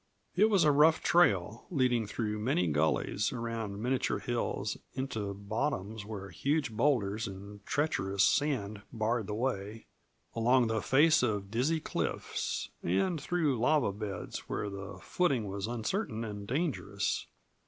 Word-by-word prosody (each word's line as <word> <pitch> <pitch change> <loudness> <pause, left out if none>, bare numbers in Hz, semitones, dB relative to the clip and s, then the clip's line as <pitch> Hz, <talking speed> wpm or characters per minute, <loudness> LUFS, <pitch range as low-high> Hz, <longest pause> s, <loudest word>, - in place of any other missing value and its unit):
It 215 - +5
was 195 -5 +4
a 150 - +5
rough 155 +3 +5
trail, 115 - +3
leading 125 - +1
through 105 0 -2
many 105 -5 +1
gullies, 80 +6 +1
around 115 -3 -4
miniature 130 +1 +1
hills, 120 -1 -2 0.2
into 110 -6 -3
bottoms 110 0 -2
where 100 -3 -7
huge 140 - 0
boulders 110 -3 +1
and 100 +1 -9
treacherous 100 -11 +1
sand 115 -9 +1
barred 115 -1 -1
the 105 - -3
way, 110 -3 -3 0.5
along 120 +2 +4
the 110 -1 0
face 155 +4 +5
of 105 -5 -1
dizzy 135 +8 +1
cliffs, - - -3
and 140 - +1
through 150 -6 0
lava 130 -2 +3
beds 100 -3 -6
where 105 - -2
the 100 0 -7
footing 140 -11 +1
was 100 +1 -3
uncertain 120 - -2
and 105 -2 -6
dangerous. 130 - -1
115 Hz, 135 wpm, -31 LUFS, 100-140 Hz, 0.5 s, It